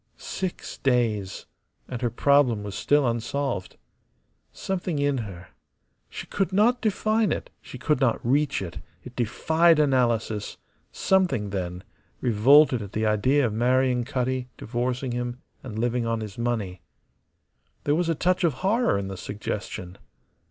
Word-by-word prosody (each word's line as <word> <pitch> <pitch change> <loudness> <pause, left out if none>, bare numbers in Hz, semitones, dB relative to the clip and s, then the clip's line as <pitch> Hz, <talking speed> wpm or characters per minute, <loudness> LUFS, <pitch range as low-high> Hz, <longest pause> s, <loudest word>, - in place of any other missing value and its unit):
Six 185 -2 -5
days, 115 -7 0 0.4
and 125 -2 -5
her 120 - +1
problem 125 -3 +3
was 100 -1 -6
still 145 +7 +2
unsolved. 120 -2 -2 0.7
Something 180 -4 -3
in 140 -2 +1
her 90 -5 -8 0.6
she - - -7
could 195 -1 -1
not 230 +6 +3
define 215 0 +1
it, - - -3
she - - -10
could 150 +2 +1
not 125 -4 +2
reach 140 -2 +1
it, 85 - -7 0.2
it 125 - -11
defied 160 +8 +3
analysis 120 -7 +1 0.3
something, 170 - +1
then, 90 -2 -4 0.4
revolted 125 +3 +5
at 100 -1 -8
the 110 +1 0
idea 130 +7 +3
of 110 - -1
marrying 125 +2 +2
Cutty, 130 -1 -2
divorcing 125 +2 -2
him, 120 +1 -3 0.2
and 110 -5 -7
living 120 +1 0
on 115 -1 -1
his 105 -3 -7
money. 110 -7 -2 1.0
There 145 - +2
was 165 +2 +1
a 165 - +2
touch 185 +4 +1
of 165 -4 +3
horror 225 - +2
in 100 -1 -3
the 95 -1 -6
suggestion. 100 -2 -5
125 Hz, 145 wpm, -25 LUFS, 110-145 Hz, 1.0 s, revolted